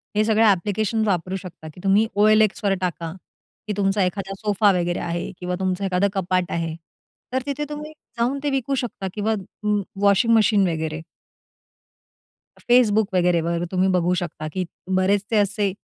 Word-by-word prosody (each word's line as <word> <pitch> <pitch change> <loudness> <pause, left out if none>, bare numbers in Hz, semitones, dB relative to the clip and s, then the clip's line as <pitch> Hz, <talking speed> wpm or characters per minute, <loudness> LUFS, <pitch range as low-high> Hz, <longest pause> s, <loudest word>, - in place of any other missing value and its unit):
हे 215 - +3
सगळे 220 0 +3
ॲप्लिकेशन्स 215 +2 +1
वापरू 185 -1 -1
शकता; 175 -4 -9
की - - -14
तुम्ही 200 +3 +3
OLXवर 215 -1 +4
टाका, 170 -2 -3 0.6
की 210 - -1
तुमचा 195 0 +2
एखादा 195 +1 -2
सोफा 205 -1 +3
वगैरे 175 0 -1
आहे 170 0 -3
किंवा 180 0 -3
तुमचं 190 0 -1
एखादं 185 +1 +2
कपाट 185 -2 0
आहे. 165 -1 -2 0.6
तर 260 - +1
तिथे 285 +1 -3
तुम्ही 300 +1 -6 0.3
जाऊन 250 +4 0
ते 290 - +1
विकू 270 0 -1
शकता 240 -6 -4
किंवा 215 +1 0 0.3
व 210 -1 +2 0.2
वॉशिंग 205 +3 +4
मशीन 210 -3 +4
वगैरे. 160 -1 -3 1.7
Facebook 220 -4 +4
वगैरे 175 -2 +3
वर 170 +1 -1
तुम्ही 185 0 +2
बघू 175 +1 +1
शकता 155 -2 -6
की 185 -1 -2 0.3
बरेचसे 205 +3 +1
असे 200 -1 +1
195 Hz, 155 wpm, -22 LUFS, 180-215 Hz, 1.7 s, OLXवर